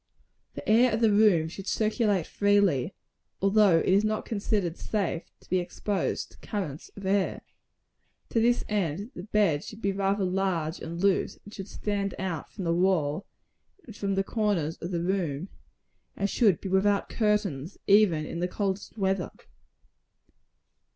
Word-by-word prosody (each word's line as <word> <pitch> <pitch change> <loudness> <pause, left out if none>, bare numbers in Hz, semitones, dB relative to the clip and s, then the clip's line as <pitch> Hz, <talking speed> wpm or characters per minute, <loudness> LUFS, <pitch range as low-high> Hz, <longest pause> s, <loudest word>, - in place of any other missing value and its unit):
The - - -8
air 235 +3 +5
of 220 - +1
the 225 -2 +4
room 205 -6 +4
should 190 +4 -8
circulate 215 -4 +1
freely; 200 -8 +2 0.4
although 195 -2 +5
it - - 0
is 195 +3 +4
not 215 0 -1
considered 200 -5 -1
safe 190 -6 -2 0.2
to - - -21
be 185 - +1
exposed 190 +2 -2
to - - -18
currents 175 -8 -5
of 200 - -9
air. 195 0 +1 0.9
To 230 - +1
this 240 +2 +3
end, 200 - -2
the - - -6
bed 195 -7 +1
should 215 - -9
be 200 -3 0
rather 195 +1 0
large 180 -3 -1
and 170 +1 -6
loose; 195 0 +1
and 205 - -12
should 195 -1 -7
stand 200 -2 -2
out 180 -4 -4
from 195 - -6
the 165 -1 +1
all, 175 -2 +1 0.6
and 225 - -11
from 200 -1 -1
the 195 - +1
corners 195 -8 0
of 170 - -6
the 170 -2 -2
room; 180 -3 -1 0.7
and 200 - +1
should 205 -5 +3
be 195 - -4
without 200 +2 +2
curtains, 205 - -1
even 195 -7 +4
in 170 - -5
the 180 - 0
coldest 195 +3 -3
weather. 190 -2 0
195 Hz, 160 wpm, -28 LUFS, 175-210 Hz, 0.9 s, air